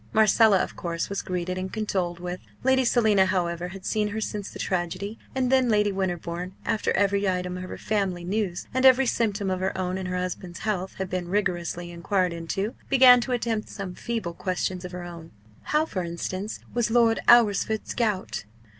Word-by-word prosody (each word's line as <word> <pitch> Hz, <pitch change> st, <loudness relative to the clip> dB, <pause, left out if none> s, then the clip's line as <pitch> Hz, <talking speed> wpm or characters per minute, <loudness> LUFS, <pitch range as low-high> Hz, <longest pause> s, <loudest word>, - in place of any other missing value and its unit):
Marcella, 220 Hz, -1 st, +5 dB
of -, -, -6 dB
course, 170 Hz, -1 st, -3 dB
was 200 Hz, -, -2 dB
greeted 185 Hz, 0 st, -3 dB
and 185 Hz, 0 st, -4 dB
condoled 185 Hz, -5 st, -2 dB
with 180 Hz, +1 st, -5 dB, 0.2 s
Lady 265 Hz, 0 st, +4 dB
Selina, 215 Hz, -5 st, +4 dB
however, 175 Hz, -2 st, -1 dB
had 190 Hz, +1 st, -10 dB
seen 215 Hz, -1 st, +1 dB
her 215 Hz, +1 st, -3 dB
since 210 Hz, -2 st, -4 dB
the -, -, -10 dB
tragedy 185 Hz, +4 st, -3 dB, 0.2 s
and 255 Hz, -1 st, +1 dB
then 260 Hz, -2 st, +4 dB
Lady 210 Hz, -1 st, +3 dB
Winterbourne, 180 Hz, -1 st, -3 dB
after 220 Hz, -, 0 dB
every 200 Hz, 0 st, +2 dB
item 180 Hz, -1 st, -2 dB
of 185 Hz, 0 st, -6 dB
her -, -, -6 dB
family 195 Hz, -5 st, -1 dB
news, 185 Hz, -1 st, -2 dB
and 260 Hz, +1 st, +1 dB
every 265 Hz, 0 st, +7 dB
symptom 210 Hz, -5 st, 0 dB
of 185 Hz, -, -1 dB
her 190 Hz, +1 st, -1 dB
own 185 Hz, 0 st, -2 dB
and 185 Hz, -, -4 dB
her 180 Hz, 0 st, -2 dB
husband's 180 Hz, 0 st, -5 dB
health 190 Hz, -3 st, -2 dB
had 190 Hz, -, -3 dB
been 180 Hz, -1 st, -2 dB
rigorously 175 Hz, -3 st, -1 dB
enquired 180 Hz, +1 st, 0 dB
into, 195 Hz, +7 st, -3 dB, 0.2 s
began 250 Hz, -2 st, +8 dB
to 255 Hz, -, -4 dB
attempt 230 Hz, -3 st, -1 dB
some 195 Hz, -3 st, -6 dB
feeble 220 Hz, -5 st, -3 dB
questions 185 Hz, +1 st, -2 dB
of 180 Hz, -, -6 dB
her 180 Hz, -1 st, -6 dB
own 170 Hz, -2 st, -9 dB, 0.4 s
how, 305 Hz, +1 st, +2 dB
for 185 Hz, -, -3 dB
instance, 185 Hz, +4 st, -4 dB, 0.2 s
was 240 Hz, -1 st, +1 dB
Lord 230 Hz, -1 st, +4 dB
Alresford's 220 Hz, -2 st, +4 dB
gout? 210 Hz, -, -1 dB
190 Hz, 190 wpm, -26 LUFS, 180-220 Hz, 0.4 s, began